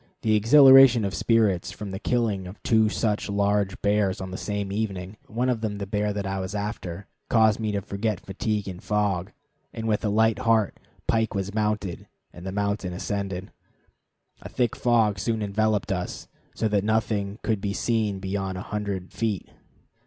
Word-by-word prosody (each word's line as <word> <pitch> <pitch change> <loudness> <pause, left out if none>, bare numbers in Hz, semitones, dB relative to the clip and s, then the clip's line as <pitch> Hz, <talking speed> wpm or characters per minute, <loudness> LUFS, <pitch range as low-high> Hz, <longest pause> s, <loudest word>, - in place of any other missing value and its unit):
The 110 -2 +3
exhilaration 130 0 +7
of 100 - -2
spirits 110 -6 +2
from 105 -2 -7
the 95 - -5
killing 105 -5 0
of 95 - -10
two 110 -1 +3
such 105 +1 -1
large 100 -1 +1
bears 100 -2 +2
on 95 -1 -6
the - - -5
same 100 0 -3
evening 100 -2 -3
one 120 +4 -1
of 125 -3 0
them 105 -2 -2
the 100 - -4
bear 105 +1 -1
that 100 -1 -3
I 95 0 -2
was 95 +2 -4
after 100 -3 -4 0.2
caused 110 -2 +4
me 110 -1 -1
to 100 -1 -2
forget 100 0 -2
fatigue 105 +1 -3
and 90 -2 -7
fog, 100 -3 0 0.4
and 115 0 -5
with 105 -2 0
a 105 - +1
light 110 +2 +3
heart 115 -5 +2 0.3
Pike 110 -1 +1
was 100 0 -2
mounted 105 -4 -2 0.3
and 90 +2 -9
the - - -3
mountain 100 -2 -2
ascended. 95 0 -4 0.9
A - - -8
thick 120 -3 0
fog 115 -5 +2
soon 110 +3 -1
enveloped 105 0 0
us, 90 -2 -4 0.3
so 110 - 0
that 100 -2 +1
nothing 105 -2 0
could 110 -4 0
be 100 - -1
seen 110 -2 0
beyond 95 0 -3
a - - -4
hundred 100 -3 -3
feet. 110 -4 -2
105 Hz, 180 wpm, -25 LUFS, 95-110 Hz, 0.9 s, exhilaration